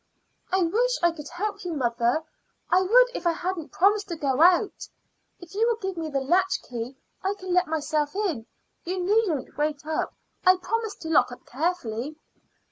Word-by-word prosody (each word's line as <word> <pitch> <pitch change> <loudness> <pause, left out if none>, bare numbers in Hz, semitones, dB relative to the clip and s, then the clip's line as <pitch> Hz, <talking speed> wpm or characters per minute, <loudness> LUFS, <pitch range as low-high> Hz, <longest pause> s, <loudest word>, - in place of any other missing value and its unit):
"I 375 0 +3
wish 480 +9 +2
I 345 - +5
could 305 -3 -9
help 400 +4 -4
you, 355 -2 -3
mother. 240 +2 +1 0.5
I 365 +1 +5
would - - +5
if 350 - -2
I 340 - +3
hadn't 345 -2 -4
promised 410 +3 +3
to 345 - -4
go 275 -2 0
out. 360 +4 +4 0.5
If 350 0 -13
you 445 +4 +2
will 470 - +2
give 385 -4 -4
me 325 -2 -3
the 275 -2 -1
latchkey 270 -7 0 0.3
I 390 +1 0
can 370 -2 -4
let 360 0 +3
myself 305 0 -1
in. 335 - -1 0.4
You 370 +2 -3
needn't 365 - +1
wait 295 -1 -1
up; 315 0 -2 0.3
I 370 -1 +7
promise 430 +4 -2
to 320 - -8
lock 305 -5 +4
up 245 - -11
carefully." 285 -3 -2
350 Hz, 180 wpm, -26 LUFS, 295-385 Hz, 0.5 s, I